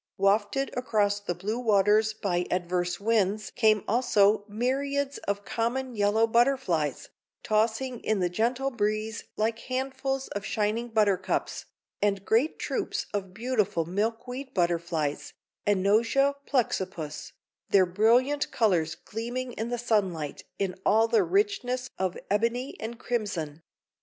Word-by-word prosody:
Wafted 205 +7 +1
across 210 -5 +1
the 190 -4 -3
blue 210 +7 -3
waters 215 -1 +3
by 180 -5 -1
adverse 175 0 -1
winds 210 -1 +1
came 215 -4 +3
also 210 -3 +3
myriads 275 +5 -1
of 200 0 -2
common 245 +2 -2
yellow 205 +2 +3
butterflies, 230 - +1 0.3
tossing 225 +3 0
in 215 -3 0
the 180 - +2
gentle 240 +9 0
breeze 215 -1 -2
like 225 +1 0
handfuls 265 +1 -2
of 205 - -4
shining 215 +2 -1
buttercups, 200 -4 0 0.4
and 200 -1 +1
great 245 +8 +2
troops - - -2
of 195 -2 -3
beautiful 220 -8 0
milkweed 230 - -3
butterflies 170 -4 -1 0.3
(Anosia 220 +8 +3
plexippus), 190 - -2 0.4
their 190 -2 +5
brilliant 240 +10 +2
colors 175 -8 +1
gleaming 245 +3 -5
in 225 +2 -4
the 245 - -1
sunlight 190 -10 -1
in 195 -2 -1
all 225 +1 +4
the 225 0 +4
richness 350 -11 0
of 185 -1 -1
ebony 235 +5 0
and 230 +2 -5
crimson. 190 -12 -3
215 Hz, 120 wpm, -28 LUFS, 195-245 Hz, 0.4 s, their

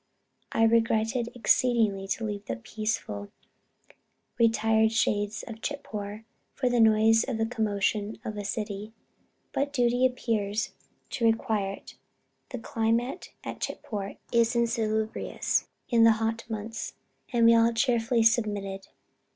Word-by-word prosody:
I 225 - +2
regretted 230 +1 +2
exceedingly 225 -5 +2
to 225 - -2
leave 205 -1 -4
the 115 - -3
peaceful, 115 - -4 1.1
retired 220 -1 +3
shades 210 -2 0
of 225 -1 -9
Chitpore 215 -7 -5 0.3
for 255 - +1
the 245 - +2
noise 220 0 +5
and 225 -3 -2
commotion 210 -1 -1
of 215 - -4
a 205 - -4
city, 210 0 -4 0.6
but 280 +1 -1
duty 245 -2 +2
appeared 220 -5 -2 0.5
to 235 - -1
require 220 -4 +1
it" - - -13 0.5
(the 255 - -5
climate 230 +5 -1
at - - -6
Chitpore 200 -2 -4 0.2
is 235 0 +3
insalubrious 220 -2 0 0.2
in 235 -2 +4
the 225 0 +7
hot 225 +1 -2
months) 220 +1 -5 0.4
"and 235 -2 +3
we 230 - +8
all 230 0 +5
cheerfully 230 -1 +2
submitted. 205 -4 +1
225 Hz, 125 wpm, -28 LUFS, 210-230 Hz, 1.1 s, we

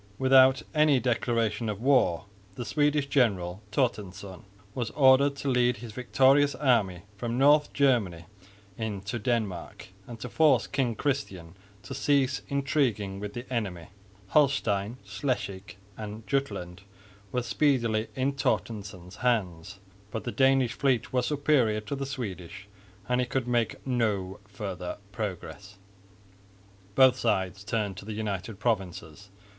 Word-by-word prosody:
Without 130 +1 +5
any 150 -3 +4
declaration 115 -2 0
of 105 -2 -4
war 125 -10 +2 0.3
the 120 - -5
Swedish 145 0 +1
general, 100 -9 +1
Torstensson, 100 -7 -3 0.3
was 120 -3 -3
ordered 140 0 +5
to 140 - -6
lead 125 -2 +2
his 115 +1 -9
victorious 135 +4 +3
army 105 - +1
from 120 +2 -3
North 145 +2 +5
Germany 110 -12 +1 0.5
into 105 0 -4
Denmark 105 -7 -3 0.2
and 120 -2 -9
to 125 - -5
force 145 0 +3
King 130 -5 -1
Christian 95 - -3 0.3
to - - -7
cease 135 -1 +1
intriguing 135 -9 0
with 105 0 -6
the 120 +1 -5
enemy. 95 -8 -3 0.4
Holstein, 120 -6 +1
Schleswig 100 -3 -4 0.2
and 105 +1 -8
Jutland 95 -10 -3 0.5
were 125 -1 -1
speedily 115 -5 +1
in 135 +2 0
Torstensson's 100 -8 -3
hands, 100 -7 -1 0.3
but 110 0 -5
the 120 - -3
Danish 130 -2 +3
fleet 130 -4 0
was 125 -1 +1
superior 145 -7 +2
to 125 +7 -5
the 135 0 -4
Swedish, 100 -7 -6 0.4
and 125 0 +1
he 125 - -1
could 130 -1 -2
make 120 -2 -1
no 105 -7 -1
further 95 -3 -6
progress. 100 -1 -6 1.2
Both 130 -1 +6
sides 95 -4 -1
turned 105 -3 -2
to 100 - -9
the 110 - -5
United 105 -1 -4
Provinces. 95 -4 -3
115 Hz, 130 wpm, -28 LUFS, 100-130 Hz, 1.2 s, Both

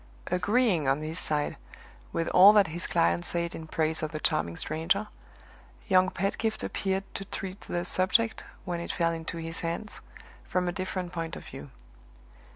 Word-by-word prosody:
Agreeing, 185 - +2
on 135 +3 +2
his 160 +1 -2
side, 150 -1 0 0.5
with 165 - -1
all 195 +3 +9
that 205 -2 +6
his 175 - +1
client 85 0 +2
said 170 0 -1
in 160 - -7
praise 160 0 0
of 155 -1 -2
the 155 - -4
charming 85 - 0
stranger, 165 +7 0 0.8
young 185 -2 +5
Pedgift 205 +4 -1
appeared 195 0 -1
to - - -4
treat 195 0 -6
the 175 0 -3
subject, 220 +6 +1 0.2
when 175 -2 -2
it 170 - -3
fell 170 -1 +1
into 165 +1 -4
his 165 0 -4
hands, 170 +6 -4 0.4
from 180 -1 -1
a - - +1
different 185 -1 -4
point 165 -1 -3
of - - -9
view. 135 +1 -9
175 Hz, 165 wpm, -29 LUFS, 160-190 Hz, 0.8 s, all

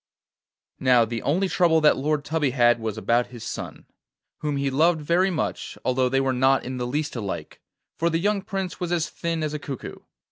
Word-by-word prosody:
Now, 125 -3 +4
the 115 0 -4
only 180 +7 +1
trouble 170 -3 +3
that 150 - +5
Lord 145 +1 -1
Tubby 155 -3 0
had 120 -2 +3
was 110 -1 -4
about 120 +2 +1
his 120 -3 -10
son, - - -6 0.5
whom 150 -2 -2
he 140 0 0
loved 160 +4 +3
very 170 +5 +2
much, 170 -4 -3
although 130 0 +2
they 135 +1 +2
were 135 -1 +1
not 130 +1 +3
in 130 0 -4
the 125 -1 -2
least 150 +3 -2
alike, 105 -5 -5 0.4
for 170 - +2
the 165 - +1
young 200 +3 +1
Prince 190 -1 -4
was 175 -1 -3
as 170 -1 0
thin 165 -2 -2
as 155 -1 -2
a 150 - -3
cuckoo. 140 -3 -7
145 Hz, 205 wpm, -24 LUFS, 125-165 Hz, 0.5 s, that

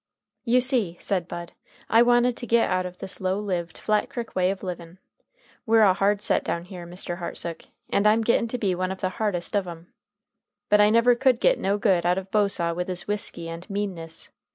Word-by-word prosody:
"You 250 +1 +4
see," 240 -10 +1
said 185 -4 -1
Bud, 175 0 -7 0.4
"I 230 - +5
wanted 240 0 +4
to 240 - -6
git 230 +1 +3
out 185 0 0
of 180 0 -11
this 190 - -8
low 190 +1 0
lived, 180 -5 -3
Flat 215 -1 0
Crick 235 -2 -6
way 185 0 +2
of 195 +1 -4
livin'. 175 -1 -7 0.7
We're 225 -1 +4
a 195 -3 +6
hard 200 +2 +1
set - - +2
down 170 0 -3
here, 180 -2 -9
Mr. 175 0 -5
Hartsook. 170 -1 -5 0.2
And 200 - +2
I'm 220 +2 +4
gittin' 235 +1 +2
to 250 - -3
be 200 -5 0
one 185 +1 -2
of 190 - -7
the 185 - 0
hardest 200 -2 -1
of 200 -2 0
'em. 170 0 -10 0.8
But 210 0 +5
I 210 - +6
never 230 +2 +5
could 250 0 +2
git - - +3
no 200 +1 0
good 190 -4 +2
out 175 +1 +2
of 190 0 -5
Bosaw 195 -5 +1
with 180 +1 -3
his 180 -1 -4
whisky 205 -5 -3
and 165 +4 -8
meanness. 185 -5 -3
195 Hz, 215 wpm, -25 LUFS, 175-220 Hz, 0.8 s, a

